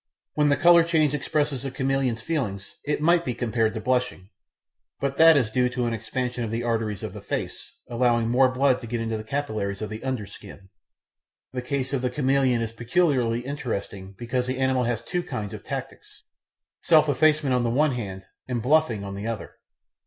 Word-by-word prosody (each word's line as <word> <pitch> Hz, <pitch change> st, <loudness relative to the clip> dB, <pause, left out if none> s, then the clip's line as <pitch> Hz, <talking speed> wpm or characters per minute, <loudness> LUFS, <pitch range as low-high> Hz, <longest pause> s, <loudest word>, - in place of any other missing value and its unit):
When 150 Hz, -1 st, +2 dB
the 140 Hz, -, +3 dB
colour 170 Hz, -2 st, +6 dB
change 160 Hz, -4 st, +2 dB
expresses 145 Hz, -2 st, -1 dB
the 135 Hz, -, -3 dB
chameleon's 130 Hz, -3 st, -1 dB
feelings 110 Hz, -11 st, -3 dB
it 150 Hz, 0 st, -1 dB
might 170 Hz, +1 st, +4 dB
be 125 Hz, -7 st, -3 dB
compared 115 Hz, -2 st, 0 dB
to -, -, -2 dB
blushing, 125 Hz, -5 st, -1 dB, 0.7 s
but 140 Hz, 0 st, -2 dB
that 165 Hz, -1 st, +8 dB
is 115 Hz, -5 st, +1 dB
due 125 Hz, +1 st, +2 dB
to 125 Hz, 0 st, -2 dB
an 115 Hz, -, -1 dB
expansion 125 Hz, +2 st, -3 dB
of 115 Hz, -, -3 dB
the 115 Hz, +2 st, -2 dB
arteries 110 Hz, -4 st, -1 dB
of -, -, -5 dB
the -, -, -8 dB
face, -, -, -5 dB, 0.2 s
allowing 120 Hz, -1 st, +1 dB
more 130 Hz, +2 st, +4 dB
blood 130 Hz, 0 st, +2 dB
to 120 Hz, -, -7 dB
get 120 Hz, +1 st, -2 dB
into 115 Hz, -1 st, -2 dB
the 110 Hz, -, -5 dB
capillaries 110 Hz, -6 st, -3 dB
of 110 Hz, -1 st, -5 dB
the 110 Hz, +1 st, -6 dB
under 130 Hz, -5 st, -2 dB
skin. 100 Hz, -1 st, -13 dB, 0.8 s
The 125 Hz, -, -2 dB
case 135 Hz, +1 st, -3 dB
of 135 Hz, -, 0 dB
the 125 Hz, -, 0 dB
chameleon 130 Hz, -2 st, +2 dB
is 115 Hz, -, -4 dB
peculiarly 120 Hz, -1 st, +1 dB
interesting 100 Hz, -8 st, -5 dB
because 125 Hz, +1 st, -2 dB
the 130 Hz, 0 st, -2 dB
animal 130 Hz, -1 st, +1 dB
has 120 Hz, -1 st, -2 dB
two 175 Hz, +9 st, -2 dB
kinds 105 Hz, -, -5 dB
of -, -, -8 dB
tactics -, -, -7 dB, 0.6 s
self 155 Hz, -2 st, +5 dB
effacement 150 Hz, -1 st, +3 dB
on 125 Hz, -1 st, +2 dB
the 120 Hz, -, +1 dB
one 145 Hz, +5 st, +2 dB
hand 95 Hz, -6 st, -5 dB, 0.2 s
and 125 Hz, -2 st, -1 dB
bluffing 125 Hz, -4 st, +2 dB
on 100 Hz, 0 st, -6 dB
the 100 Hz, +3 st, -5 dB
other. 115 Hz, -2 st, -4 dB
125 Hz, 195 wpm, -25 LUFS, 115-140 Hz, 0.8 s, that